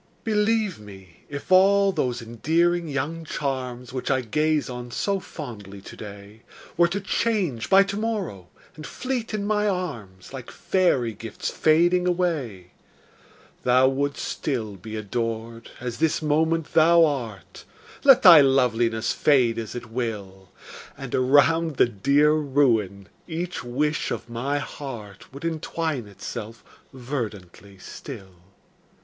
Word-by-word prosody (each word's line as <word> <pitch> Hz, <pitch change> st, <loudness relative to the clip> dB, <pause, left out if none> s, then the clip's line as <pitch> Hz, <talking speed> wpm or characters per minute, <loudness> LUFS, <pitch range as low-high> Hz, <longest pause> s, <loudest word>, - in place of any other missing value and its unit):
Believe 215 Hz, -, +1 dB
me, 95 Hz, -4 st, -14 dB
if 145 Hz, +5 st, -7 dB
all 195 Hz, +1 st, +5 dB
those 125 Hz, -8 st, -2 dB
endearing 165 Hz, +9 st, 0 dB
young 150 Hz, +3 st, -3 dB
charms, 130 Hz, -5 st, -4 dB
Which 130 Hz, -, -4 dB
I 135 Hz, -1 st, +2 dB
gaze 150 Hz, +6 st, 0 dB
on 125 Hz, -1 st, -7 dB
so 195 Hz, -, -1 dB
fondly 110 Hz, -, -9 dB
today, 100 Hz, +2 st, -11 dB, 0.3 s
Were 170 Hz, 0 st, +4 dB
to 190 Hz, +4 st, -3 dB
change 190 Hz, -, -1 dB
by 195 Hz, +1 st, +7 dB
to 200 Hz, 0 st, -4 dB
morrow, 205 Hz, -, -3 dB, 0.3 s
and 155 Hz, 0 st, -9 dB
fleet 255 Hz, -3 st, -4 dB
in 210 Hz, -2 st, -2 dB
my 210 Hz, 0 st, +1 dB
arms, 120 Hz, -, -5 dB
Like 130 Hz, -3 st, -8 dB
fairy 135 Hz, -, +1 dB
gifts 115 Hz, +1 st, -6 dB
fading 175 Hz, +3 st, +3 dB
away, 145 Hz, -, -2 dB, 0.9 s
Thou 130 Hz, +1 st, +4 dB
wouldst 140 Hz, +1 st, -2 dB
still 115 Hz, -8 st, -3 dB
be 110 Hz, +4 st, -8 dB
adored, 115 Hz, +2 st, -4 dB
as 120 Hz, -1 st, -5 dB
this 160 Hz, -1 st, +2 dB
moment 160 Hz, +1 st, 0 dB
thou 165 Hz, +1 st, +6 dB
art. 120 Hz, -, -5 dB, 0.4 s
Let 270 Hz, -3 st, +7 dB
thy 170 Hz, -6 st, +10 dB
loveliness 120 Hz, -4 st, +2 dB
fade 125 Hz, -6 st, +3 dB
as 110 Hz, 0 st, -6 dB
it 120 Hz, -2 st, -8 dB
will. 100 Hz, -6 st, -5 dB, 0.5 s
And -, -, -8 dB
around 145 Hz, +5 st, +3 dB
the -, -, +5 dB
dear 140 Hz, +7 st, +2 dB
ruin 120 Hz, -10 st, +1 dB, 0.2 s
each 175 Hz, +1 st, -4 dB
wish 150 Hz, +5 st, -1 dB
of -, -, -4 dB
my 125 Hz, +5 st, -2 dB
heart 120 Hz, -9 st, -8 dB
Would 140 Hz, +4 st, -9 dB
entwine 160 Hz, -5 st, -3 dB
itself 105 Hz, +2 st, -8 dB, 0.3 s
verdantly 105 Hz, -7 st, -6 dB
still. 100 Hz, 0 st, -10 dB
135 Hz, 130 wpm, -24 LUFS, 115-165 Hz, 0.9 s, thy